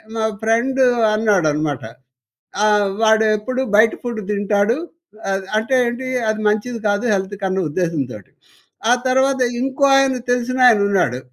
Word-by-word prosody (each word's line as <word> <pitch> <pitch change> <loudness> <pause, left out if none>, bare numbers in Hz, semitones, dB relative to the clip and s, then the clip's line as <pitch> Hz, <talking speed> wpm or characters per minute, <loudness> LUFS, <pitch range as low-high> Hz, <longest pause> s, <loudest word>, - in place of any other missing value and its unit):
మా 220 -1 -1 0.2
ఫ్రెండు 240 +4 +1 0.3
అన్నాడనమాట. 155 - 0 0.8
ఆహ్, 210 -1 +3
"వాడెప్పుడు 220 +3 +1
బయట 220 +2 +5
ఫుడ్డు 235 -3 -4
తింటాడు." 205 +2 +1 0.5
అద్ 195 0 -1
అంటే 220 +4 0
ఏంటి? 240 +2 -4 0.2
అది 215 0 -1
మంచిది 215 +3 -2
కాదు 205 +2 0
హెల్త్‌కి 195 +1 -4
అన్న 190 0 -2
ఉద్దేశంతోటి. 145 - -4 0.6
ఆ - - +6
తర్వాత 265 +1 +1 0.2
ఇంకో 270 +2 -1
ఆయన 270 -1 +3 0.2
తెలిసినాయన 245 -2 +3
ఉన్నాడు. 180 -11 0
215 Hz, 120 wpm, -19 LUFS, 200-245 Hz, 0.8 s, ఆ